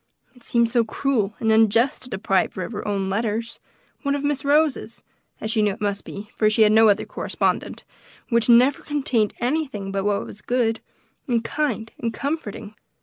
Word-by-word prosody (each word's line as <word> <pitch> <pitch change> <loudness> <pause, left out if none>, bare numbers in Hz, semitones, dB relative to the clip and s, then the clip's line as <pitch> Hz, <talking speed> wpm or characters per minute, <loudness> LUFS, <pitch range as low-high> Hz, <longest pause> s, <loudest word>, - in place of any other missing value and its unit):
It 245 - -21
seemed 235 0 +2
so 235 -1 +3
cruel 220 -2 -1
and 220 -1 +1
unjust 225 +3 +3
to 255 - -8
deprive 190 -3 0
her 185 - -3
of - - -6
her 210 - -5
own 200 -2 -1
letters; 225 +3 -2 0.4
one 280 -1 0
of 285 - -3
Miss 285 -2 -1
Rose's 285 -5 +1 0.4
as 215 - -2
she 220 - +2
knew 205 -2 +2
it - - -12
must 205 -1 -2
be, 205 +1 -9
for 215 - +3
she 220 +1 +4
had 210 - +5
no 220 0 +6
other 200 - +2
correspondent - - -2 0.5
which 235 -1 +2
never 250 +4 +5
contained 265 -7 0
anything 245 -7 -2
but 195 0 -1
what 205 0 0
was 210 - -11
good, 235 -2 0 0.5
and 235 -3 +1
kind, 235 -6 -2
and 230 - -2
comforting. 230 -8 -4
225 Hz, 190 wpm, -23 LUFS, 210-255 Hz, 0.5 s, no